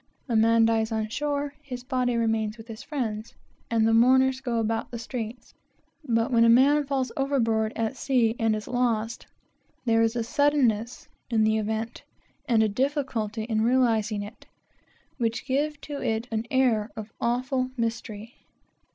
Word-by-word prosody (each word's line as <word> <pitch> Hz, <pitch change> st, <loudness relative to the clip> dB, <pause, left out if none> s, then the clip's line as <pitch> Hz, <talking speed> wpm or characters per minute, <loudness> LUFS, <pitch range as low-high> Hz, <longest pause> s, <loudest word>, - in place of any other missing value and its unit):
A 235 Hz, -, -1 dB
man 225 Hz, +1 st, +5 dB
dies 225 Hz, 0 st, +1 dB
on 220 Hz, -1 st, -1 dB
shore; 285 Hz, +2 st, -2 dB
his 250 Hz, -4 st, -7 dB
body 250 Hz, -2 st, 0 dB
remains 220 Hz, -1 st, 0 dB
with 225 Hz, 0 st, -12 dB
his 225 Hz, -1 st, -8 dB
friends, 230 Hz, -6 st, -4 dB, 0.3 s
and 225 Hz, -1 st, +2 dB
"the 225 Hz, -, +3 dB
mourners 260 Hz, +3 st, +4 dB
go 245 Hz, -3 st, -2 dB
about 225 Hz, 0 st, -1 dB
the 235 Hz, -, -6 dB
streets;" 230 Hz, 0 st, -6 dB, 0.5 s
but 230 Hz, -1 st, 0 dB
when 230 Hz, -1 st, +5 dB
a 230 Hz, -, +5 dB
man 280 Hz, +5 st, +5 dB
falls 265 Hz, -3 st, -1 dB
overboard 230 Hz, -6 st, +1 dB
at 225 Hz, +2 st, -2 dB
sea 240 Hz, -5 st, +1 dB
and 225 Hz, -1 st, +2 dB
is 210 Hz, -1 st, -6 dB
lost, 235 Hz, -2 st, -1 dB, 0.6 s
there 225 Hz, -1 st, +3 dB
is 225 Hz, +1 st, +1 dB
a 235 Hz, -, 0 dB
suddenness 245 Hz, -3 st, +1 dB, 0.2 s
in 225 Hz, -2 st, +2 dB
the 220 Hz, 0 st, +2 dB
event, 220 Hz, +2 st, -3 dB, 0.5 s
and 225 Hz, -3 st, +4 dB
a -, -, +3 dB
difficulty 235 Hz, -3 st, -1 dB
in 220 Hz, -1 st, -1 dB
realizing 225 Hz, -3 st, +2 dB
it, 205 Hz, +3 st, -12 dB, 0.7 s
which 230 Hz, -1 st, -1 dB
give 290 Hz, +3 st, -1 dB
to 290 Hz, -1 st, -6 dB
it 225 Hz, +2 st, -1 dB
an 225 Hz, +1 st, -2 dB
air 240 Hz, -5 st, +2 dB
of 220 Hz, 0 st, -7 dB
awful 255 Hz, +2 st, 0 dB
mystery. 230 Hz, -1 st, -4 dB
230 Hz, 160 wpm, -26 LUFS, 220-255 Hz, 0.7 s, man